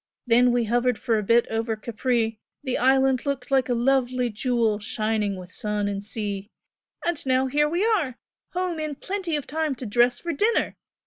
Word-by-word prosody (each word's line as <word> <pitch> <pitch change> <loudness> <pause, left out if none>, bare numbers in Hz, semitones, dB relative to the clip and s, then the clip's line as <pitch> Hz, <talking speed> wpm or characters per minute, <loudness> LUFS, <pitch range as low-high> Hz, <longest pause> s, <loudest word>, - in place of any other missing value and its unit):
Then 245 +1 +5
we 240 0 +2
hovered 240 +1 +1
for 225 -2 +1
a - - -3
bit 230 +3 +4
over 225 0 -1
Capri, 225 0 -1 0.2
the 260 -3 -1
island 265 0 +3
looked 280 -2 -3
like 265 -1 +3
a 245 - +2
lovely 250 0 +1
jewel 225 -1 +1
shining 215 -2 -1
with 180 -1 -10
sun 210 0 -1
and 200 0 -3
sea, 205 -1 -4 0.6
and 345 -3 0
now 260 0 +2
here 295 +3 +2
we 350 +6 +1
are! 360 - +1 0.4
home 360 -2 -2
in 305 -2 -3
plenty 375 -1 -3
of 290 - -3
time 310 -1 -1
to 250 - -7
dress 240 +3 +3
for 340 -1 -3
dinner! 430 +10 +1
245 Hz, 185 wpm, -25 LUFS, 225-280 Hz, 0.6 s, Then